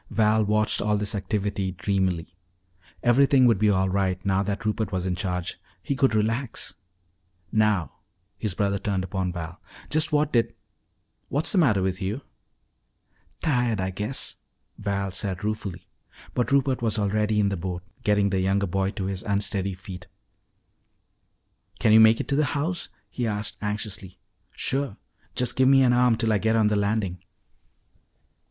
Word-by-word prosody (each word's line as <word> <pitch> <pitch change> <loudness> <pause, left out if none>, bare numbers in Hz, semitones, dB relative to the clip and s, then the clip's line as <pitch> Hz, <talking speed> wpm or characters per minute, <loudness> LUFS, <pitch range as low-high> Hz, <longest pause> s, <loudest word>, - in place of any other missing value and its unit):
Val 110 0 +3
watched 105 +1 +2
all 105 0 +1
this 105 0 -1
activity 100 -1 -2
dreamily. 90 -2 -1 0.7
Everything 130 +2 +5
would 115 -5 +4
be 105 - +4
all 95 -1 +2
right 95 -1 -1
now 95 0 +2
that 100 +1 -3
Rupert 105 -1 -1
was 95 -1 -2
in 95 - 0
charge. 90 -1 -3 0.2
He 140 - -1
could 135 -4 +2
relax 115 +3 -1 0.8
"Now," 105 -6 +2 0.5
his 105 -4 -2
brother 100 0 0
turned 95 -1 -1
upon 95 -1 -2
Val, 85 0 -7 0.3
"just 155 +2 +2
what 150 0 +1
did 115 -2 +2 0.7
What's 145 +3 0
the 195 - +3
matter 110 - +3
with 95 +1 -2
you?" 100 +8 -2 1.2
"Tired, 120 -8 +1
I 95 0 -1
guess," 105 +8 -1 0.4
Val 100 -1 -2
said 95 -1 -3
ruefully. 105 -4 -4 0.5
But 125 - 0
Rupert 135 -2 +2
was 115 -2 +1
already 105 +1 +1
in 100 -1 +3
the 100 - -1
boat, 90 0 -4 0.2
getting 105 -1 +2
the 95 - +1
younger 95 +2 +1
boy 95 +1 0
to 100 -4 -4
his 95 -1 -3
unsteady 100 -1 -1
feet. 90 -1 -10 1.7
"Can 110 0 +3
you 110 - +9
make 110 +1 +7
it - - -3
to 140 - +2
the 150 +1 +3
house?" 170 +5 -2 0.2
he 120 -2 -2
asked 105 0 -3
anxiously. 105 -2 -4 0.3
"Sure. 135 -5 -2 0.4
Just 125 -1 0
give 130 0 +4
me 135 0 +6
an 125 -1 +4
arm 125 -2 +4
till 110 -2 +1
I 105 - +2
get 110 +2 +2
on 110 -2 +4
the 105 - +1
landing." 100 -3 -1
105 Hz, 160 wpm, -25 LUFS, 95-115 Hz, 1.7 s, you